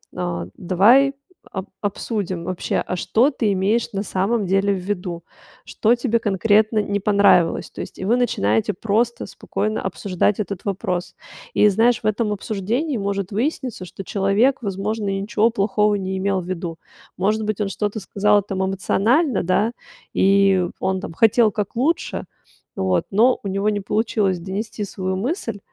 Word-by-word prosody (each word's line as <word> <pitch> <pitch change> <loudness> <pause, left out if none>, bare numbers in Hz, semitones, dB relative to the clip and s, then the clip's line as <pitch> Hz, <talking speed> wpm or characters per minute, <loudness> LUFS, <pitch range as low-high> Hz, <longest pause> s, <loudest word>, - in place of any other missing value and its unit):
"А, 90 -1 -3
давай 225 +10 +4 0.4
об 190 0 -5
обсудим 200 -3 -3
вообще, 185 0 -3
а - - -2
что 235 - +2
ты 225 -6 0
имеешь 200 +5 0
на 195 0 -2
самом 200 +3 0
деле 195 +2 +2
в - - -2
виду? 180 -2 -4 0.4
Что 225 +2 +2
тебе 235 -1 0
конкретно 215 +2 +2
не 205 0 -1
понравилось?". 200 -4 +3
То - - -7
есть - - -8
и 185 - -4
вы 225 +5 +3
начинаете 110 - +1
просто 225 +5 0
спокойно 215 +1 -3
обсуждать 190 +1 -1
этот 200 -3 -4
вопрос. 185 -3 -3 0.4
И, - - +6
знаешь, 225 +4 +3
в - - -9
этом 215 0 0
обсуждении 225 - -2
может 200 -1 -2
выясниться, 240 - -2
что 190 +2 -9
человек, 200 +8 +1
возможно, 200 +1 -2
и 195 0 -1
ничего 220 +2 +2
плохого 210 0 +1
не 190 -1 -3
имел 195 -1 0
в 175 - -10
виду. 175 -2 -4 0.4
Может 215 +4 +1
быть, 215 -1 -2
он 200 - 0
что-то 205 +2 -2
сказал 205 +1 +2
там 190 -1 -3
эмоционально, 220 - +1
да, 190 +6 +1 0.4
и 195 -2 +4
он, 190 0 -1
там, 165 - -7
хотел 225 +3 +4
как 205 +1 -4
лучше 290 +8 -1 0.5
вот, 95 -2 +1
но 235 +6 +4
у 200 - -3
него 195 +2 -1
не 205 -1 -1
получилось 205 -2 0
донести 205 +4 -4
свою 185 -1 -3
мысль. 230 - -3
200 Hz, 160 wpm, -21 LUFS, 190-220 Hz, 0.5 s, И